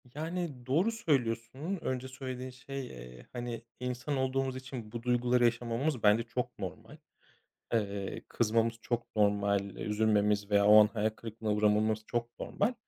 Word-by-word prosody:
Yani, 160 -5 -4
doğru 165 - +2
söylüyorsun. 135 - -1
Önce 130 0 -2
söylediğin 130 -1 -6
şey, 130 +1 -6
eee, 60 0 -11
hani, 120 -2 -4 0.2
insan 125 +3 -2
olduğumuz 130 0 0
için 130 -4 -7
bu 115 0 -6
duyguları 125 0 +3
yaşamamız 120 +3 0
bence 105 +2 +5
çok 125 +1 -4
normal. - - -7 0.8
Eee, 100 -3 -1
kızmamız 115 0 +2
çok 120 -1 -3
normal. 100 -1 +3 0.2
Üzülmemiz 105 -1 +1
veya 100 -1 +4
o 105 +1 +9
an 105 - +6
hayal 110 0 0
kırıklığına 110 0 -5
uğramamız 105 +1 +2
çok 120 0 -3
normal. 220 +5 0
120 Hz, 140 wpm, -31 LUFS, 105-130 Hz, 0.8 s, o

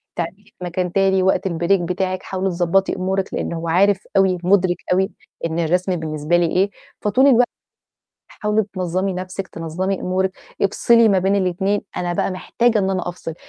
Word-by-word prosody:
تعملي 175 +4 -4
في - - -24
مكان 180 0 -2
تاني 190 -1 +2
وقت 190 0 +2
الBreak 175 +2 +1
بتاعِك، 185 +2 -2
حاولي 190 0 -2
تضبّطي 180 +2 +1
أمورِك"، 190 +1 -2
لإن - - -2
هو 165 0 -4
عارف 195 +4 +2
أوي 190 -2 +4
مُدرِك 185 -1 +3 0.2
أوي 190 +2 +1 0.3
إن 165 +1 -2
الرسم 180 +3 +1
بالنسبة 155 +1 -1
لي 175 - +3
إيه، 185 +4 +1 0.3
فطول 255 +7 +3
الوقت 245 -2 +5 0.8
"حاولي 210 0 0
تنظّمي 185 +1 -1
نفْسِك، 185 +1 -5
تنظّمي 180 +4 -3
أمورِك، 185 +1 0 0.3
افصلي 230 +3 +4
ما 195 -2 +3
بين 195 +2 +2
الاتنين"، 190 +2 0 0.2
أنا 175 -1 -1
بقى 180 - 0
محتاجة 225 +5 +1
إن 195 -1 +1
أنا 185 -2 -2
أفصل، 165 -2 -6
185 Hz, 170 wpm, -20 LUFS, 175-195 Hz, 0.8 s, الوقت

